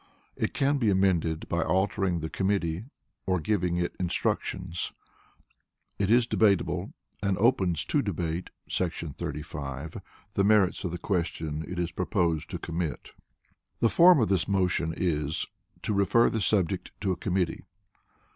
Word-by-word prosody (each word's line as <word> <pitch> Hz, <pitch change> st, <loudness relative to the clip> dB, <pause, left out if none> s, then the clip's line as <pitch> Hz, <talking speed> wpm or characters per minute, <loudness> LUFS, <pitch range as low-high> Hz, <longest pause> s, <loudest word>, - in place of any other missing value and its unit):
It -, -, -2 dB
can 140 Hz, +1 st, +2 dB
be 115 Hz, -4 st, +2 dB
amended 90 Hz, -5 st, +1 dB
by 85 Hz, -, 0 dB
altering 95 Hz, -1 st, +1 dB
the 80 Hz, -, -3 dB
committee, 95 Hz, -1 st, 0 dB, 0.4 s
or 95 Hz, -1 st, +2 dB
giving 90 Hz, -1 st, 0 dB
it 85 Hz, 0 st, -1 dB
instructions. 90 Hz, 0 st, -1 dB, 1.1 s
It 100 Hz, -1 st, +1 dB
is 120 Hz, +1 st, +5 dB
debatable, 105 Hz, -5 st, +1 dB, 0.3 s
and 100 Hz, -2 st, +1 dB
opens 95 Hz, -, +2 dB
to 145 Hz, -, +1 dB
debate 85 Hz, -5 st, -3 dB, 0.2 s
[§ 85 Hz, -5 st, -2 dB
35] 75 Hz, 0 st, -5 dB, 0.3 s
the 100 Hz, -, +2 dB
merits 100 Hz, -3 st, +3 dB
of 90 Hz, -, -1 dB
the 90 Hz, -, -4 dB
question 80 Hz, -4 st, -2 dB
it 90 Hz, -, -6 dB
is 85 Hz, -1 st, -1 dB
proposed 85 Hz, -4 st, 0 dB
to -, -, -3 dB
commit. 85 Hz, -2 st, -4 dB, 0.7 s
The 115 Hz, -, +4 dB
Form 175 Hz, +2 st, +7 dB
of 110 Hz, -, +2 dB
this 95 Hz, -3 st, +1 dB
motion 90 Hz, -4 st, +1 dB
is 80 Hz, -3 st, 0 dB, 0.4 s
"to 105 Hz, -, 0 dB
refer 100 Hz, +4 st, +4 dB
the 110 Hz, -, -1 dB
subject 95 Hz, -5 st, +1 dB
to 100 Hz, -3 st, +1 dB
a -, -, 0 dB
committee." 90 Hz, -3 st, -1 dB
90 Hz, 145 wpm, -28 LUFS, 85-100 Hz, 1.1 s, Form